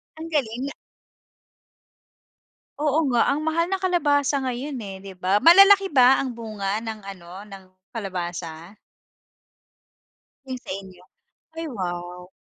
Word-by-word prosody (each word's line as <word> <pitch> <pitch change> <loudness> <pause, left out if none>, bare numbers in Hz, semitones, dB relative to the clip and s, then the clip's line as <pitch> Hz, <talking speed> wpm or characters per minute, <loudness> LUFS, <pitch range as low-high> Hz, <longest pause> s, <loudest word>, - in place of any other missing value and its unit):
Ang 325 +1 -8
galing 260 -2 -1
na - - -9 2.0
Oo 300 +1 +1
nga 240 -2 +3
ang 300 - -2
mahal 320 +2 +1
ng 380 - -2
kalabasa 290 -6 +2
ngayon 260 +1 -3
eh, 195 -1 -7
di 195 -1 -10
ba? 190 +3 +1
Malalaki 390 +3 +7
ba 260 -1 +5
ang 265 - -3
bunga 210 -3 -3
ng 220 -1 -6
ano 180 0 -10
ng 195 -1 -11 0.3
kalabasa? 175 -3 -6 1.7
Yung 260 -1 -5
sa - - -14
inyo, 190 -2 -11 0.6
ay 330 - -3
wow. 180 -4 -6
230 Hz, 125 wpm, -24 LUFS, 190-290 Hz, 2.0 s, Malalaki